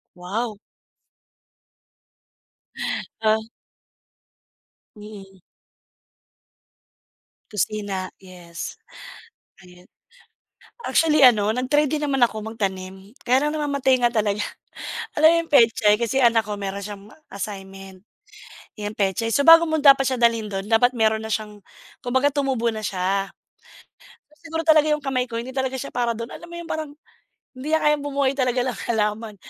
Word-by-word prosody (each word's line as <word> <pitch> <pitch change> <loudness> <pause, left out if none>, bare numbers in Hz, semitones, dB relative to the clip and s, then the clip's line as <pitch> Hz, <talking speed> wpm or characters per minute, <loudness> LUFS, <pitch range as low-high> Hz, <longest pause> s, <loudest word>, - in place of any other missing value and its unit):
Wow. 205 +4 -4 2.6
Ah. 220 0 +2 1.5
Mm. 200 -2 -12 2.1
Kusina, 205 -2 -2 0.2
yes. 175 -2 -9 0.8
Ayun. 180 -1 -17 1.0
Actually, 305 -3 +2
ano, 220 -4 +5
nag-try 290 +5 +1
din 300 +2 -2
naman 280 -2 0
ako 220 -2 -7
magtanim. 195 -2 -5
Kaya 260 +4 +2
lang 300 - -2
namamatay 280 -3 +1
nga 240 - +4
talaga. 210 -2 0 0.8
Alam 310 +1 +7
mo - - +3
yung 330 - -14
petsay, 225 -5 +5
kasi 240 +3 0
anak 230 -3 +4
ko 210 - -4
meron 200 0 -5
siyang 205 -1 -8
ma - - -17 0.2
assignment, 195 -1 -8 0.8
yan 210 0 -5
petsay. 200 +3 0
So, 280 - +2
bago 330 0 +8
mo 315 - +1
dapat 270 -2 +6
siya 260 -2 -2
dalhin 230 -2 +2
do'n 195 -1 -4
dapat 245 +2 +3
meron 220 -1 +2
na - - -6
siyang 210 -1 -4 0.4
kumbaga 260 +3 +1
tumubo 260 -5 0
na 220 - -5
siya. 195 0 -2 1.1
Siguro 325 0 -4
talaga 310 -1 +5
yung 300 -1 0
kamay 255 -2 -1
ko 230 - -6
hindi 240 +3 -5
talaga 265 0 -2
siya 265 - -6
para 240 -1 -1
dun. 230 +1 -7
Alam 340 - -10
mo 340 - -11
yun 345 - -7
parang, 315 -2 -4 0.7
hindi 260 - -7
niya 315 - +3
kayang 300 -1 +2
bumuhay 280 -1 0
talaga 250 -1 +1
ng 250 -4 -3
halaman. 215 -1 -1
230 Hz, 135 wpm, -22 LUFS, 205-270 Hz, 2.6 s, bago